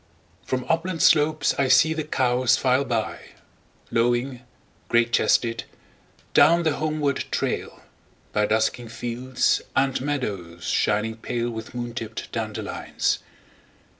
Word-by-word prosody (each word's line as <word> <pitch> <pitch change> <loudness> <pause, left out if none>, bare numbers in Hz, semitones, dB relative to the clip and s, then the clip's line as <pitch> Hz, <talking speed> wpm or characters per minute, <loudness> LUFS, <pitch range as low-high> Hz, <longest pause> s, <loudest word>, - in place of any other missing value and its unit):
1From 130 -1 -2
upland 165 +1 0
slopes 155 +1 +4
I 135 - +3
see 135 +5 +5
the 160 -1 -2
cows 130 -4 +2
file 130 +1 +2
by,2Lowing, 120 +1 -3 0.5
great 120 0 +2
chested, 115 -1 +2 0.7
down 170 +1 +6
the 155 -3 +1
homeward 155 -2 -1
trail,3By 105 0 -4
dusking 110 +2 +1
fields 120 +3 -1
and 135 -1 +1
meadows 100 -12 -4
shining 105 +5 0
pale4With 115 0 -4
moon 120 -1 -4
tipped 115 -2 -6
dandelions. 110 -2 -2
125 Hz, 105 wpm, -24 LUFS, 115-140 Hz, 0.7 s, down